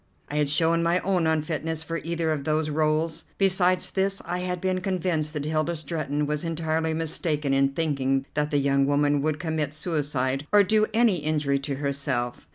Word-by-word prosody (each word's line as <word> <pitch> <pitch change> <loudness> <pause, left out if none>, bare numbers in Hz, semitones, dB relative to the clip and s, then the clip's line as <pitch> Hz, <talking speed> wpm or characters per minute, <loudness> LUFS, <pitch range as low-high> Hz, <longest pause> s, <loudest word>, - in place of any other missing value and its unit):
I 150 - -2
had 150 -1 +2
shown 165 +3 +2
my 170 +1 +2
own 180 -4 +1
unfitness 160 0 -1
for 165 +1 -3
either 165 0 -1
of 150 -3 -2
those 155 +1 0
rôles. 155 +1 0
Besides 185 -2 +2
this, 195 0 0
I 175 +1 -2
had 180 0 -3
been 185 0 -1
convinced 180 -5 -1
that 150 -2 -3
Hilda 155 +2 0
Stretton 150 -2 -2
was 150 +1 -2
entirely 160 -1 -1
mistaken 155 -3 -1
in 135 0 +3
thinking 135 -3 0
that 150 0 0
the 145 - +1
young 140 -1 +2
woman 145 0 +2
would 155 0 0
commit 155 -2 -2
suicide 145 -4 -1
or 205 0 +7
do 215 +2 +3
any 225 -3 +3
injury 150 -3 0
to 140 0 -3
herself. 140 - -2
155 Hz, 180 wpm, -26 LUFS, 145-170 Hz, -, or